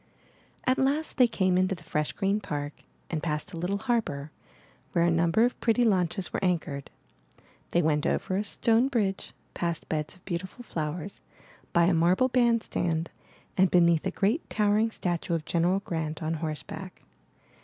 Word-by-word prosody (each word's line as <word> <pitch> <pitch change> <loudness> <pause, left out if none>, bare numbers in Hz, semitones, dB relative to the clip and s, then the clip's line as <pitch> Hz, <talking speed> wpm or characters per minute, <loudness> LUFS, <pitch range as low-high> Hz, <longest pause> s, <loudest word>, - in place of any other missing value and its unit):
At 255 +1 +2
last 285 +4 +1
they 250 -2 +6
came 185 -5 +2
into 185 +1 +1
the 170 - -15
fresh 150 -2 -1
green 200 +1 +1
park 145 -7 -4 0.4
and 160 -2 -1
passed 150 +2 -3
a - - -5
little 180 +4 -1
harbor, 200 - -1 0.6
where 170 - +3
a 170 - +3
number 170 +7 +3
of 245 - -2
pretty 235 +1 +3
launches 185 -3 +1
were - - -2
anchored. 165 -6 -1 0.8
They 175 - +2
went 150 -1 +2
over 185 - 0
a 205 - 0
stone 230 +4 +2
bridge, 210 -8 -1 0.2
past 170 -2 -2
beds 155 +1 -2
of 185 - -24
beautiful 185 +6 -5
flowers, 160 0 -4 0.5
by 170 - +4
a 175 +2 +4
marble 175 +10 +3
band 235 -2 +3
stand, 165 -1 -1 0.4
and 190 0 +4
beneath 170 -2 +4
a - - 0
great 220 +11 0
towering 210 +1 +2
statue 175 -4 -2
of 155 -2 -3
General 180 +3 +1
Grant 160 -4 -3
on 160 +1 -1
horseback. 160 +4 -5
180 Hz, 165 wpm, -28 LUFS, 165-210 Hz, 0.8 s, they